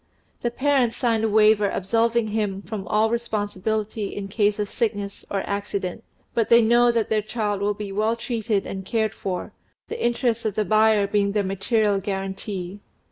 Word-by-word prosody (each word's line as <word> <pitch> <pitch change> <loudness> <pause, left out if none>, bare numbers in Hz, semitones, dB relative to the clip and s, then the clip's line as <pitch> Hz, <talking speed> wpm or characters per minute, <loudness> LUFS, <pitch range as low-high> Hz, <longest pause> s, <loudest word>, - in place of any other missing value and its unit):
The 240 - 0
parents 260 -2 +1
sign 230 -3 +1
a 225 - +2
paper 210 -1 +4
absolving 225 +4 +1
him 205 -2 -2
from 205 -4 -6
all 215 +3 +2
responsibility 215 -2 -2
in 195 -1 -5
case 205 0 +1
of 210 -1 -1
sickness 205 -3 -3
or 195 -1 -1
accident; 200 0 -3 0.3
but 230 -3 +1
they 235 - +8
know 240 +2 +5
that 230 -2 0
their 215 -1 +2
child 210 -2 -2
will 205 +1 0
be 205 -1 -6
well 215 +3 +1
treated 230 -4 -1
and 190 0 -5
cared 220 +2 0
for, 185 -4 -4 0.4
the 460 +1 -4
interests 235 -1 +1
of 215 -3 -2
the 215 - +1
buyer 215 -1 +4
being 200 0 +1
their 210 -1 +1
material 200 +2 +1
guarantee. 195 -1 -4
215 Hz, 175 wpm, -24 LUFS, 200-225 Hz, 0.4 s, they